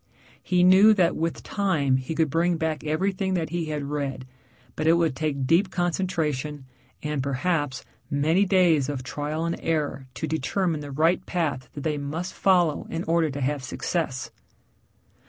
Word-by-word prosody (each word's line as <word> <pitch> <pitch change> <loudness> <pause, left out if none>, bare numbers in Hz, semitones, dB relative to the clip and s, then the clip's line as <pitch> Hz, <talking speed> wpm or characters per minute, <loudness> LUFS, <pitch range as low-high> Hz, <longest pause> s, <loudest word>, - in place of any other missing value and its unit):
He 180 -1 +2
knew 195 +4 +7
that 180 -3 +3
with 165 +1 -2
time 155 -10 +1
he 130 +5 -4
could 160 -3 +1
bring 170 +2 +2
back 160 -2 -2
everything 190 +5 0
that 160 -3 -2
he 170 -1 -1
had 150 -2 -3
read, 140 -2 -3 0.5
but 155 - -1
it 165 - +6
would 165 -5 +2
take 140 -3 -1
deep 170 +7 +3
concentration 160 -6 -2 0.4
and, 150 -2 -1
perhaps, 140 0 -1 0.2
many 155 +6 +2
days 175 -8 +3
of 135 -3 -3
trial 150 +5 -3
and 170 - -2
error 150 -4 -1
to 120 - -3
determine 160 +3 -1
the 145 -1 -7
right 160 +6 +2
path 145 -8 -2
that 145 - -6
they 150 -2 -1
must 155 +6 -4
follow 175 -6 +2
in 165 +1 -3
order 165 -1 +2
to 140 0 -5
have 140 +2 -1
success. 135 -1 -3
160 Hz, 165 wpm, -25 LUFS, 145-175 Hz, 0.5 s, knew